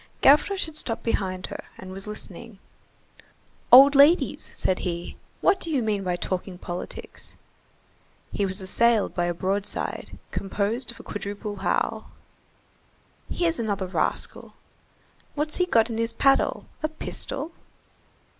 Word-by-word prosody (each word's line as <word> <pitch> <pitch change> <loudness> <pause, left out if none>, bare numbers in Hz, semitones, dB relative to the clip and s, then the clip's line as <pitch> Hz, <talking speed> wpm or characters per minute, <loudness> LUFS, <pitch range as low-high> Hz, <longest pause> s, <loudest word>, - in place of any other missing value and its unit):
Gavroche 340 +8 +5
had 315 -2 -10
stopped 230 -6 -3
behind 185 -5 -1
her - - -7
and 185 0 -9
was 195 +2 -5
listening. 210 +1 -8 1.1
"Old 275 +3 +10
ladies," 290 +5 +4
said 185 - 0
he, 170 -1 -4 0.3
"what 380 0 +4
do 335 - -2
you 275 -6 +1
mean 210 -2 0
by 180 -1 0
talking 180 +1 -3
politics?" 175 0 -7 1.0
He 205 - -1
was 190 0 -2
assailed 230 +3 +3
by 175 - 0
a 175 - 0
broadside, 195 +3 -3
composed 210 +5 -1
of 235 - -8
a - - -10
quadruple 205 0 -5
howl. 190 - -1 1.2
"Here's 335 -2 0
another 205 -4 -1
rascal." 185 - -2 0.8
"What's 305 +3 -2
that 360 - +4
he's 360 - -20
got 230 +1 +4
in 225 - -3
his 230 0 0
paddle? 275 +2 +3 0.2
A 310 - +1
pistol?" 310 -1 -3
215 Hz, 135 wpm, -25 LUFS, 190-275 Hz, 1.2 s, Old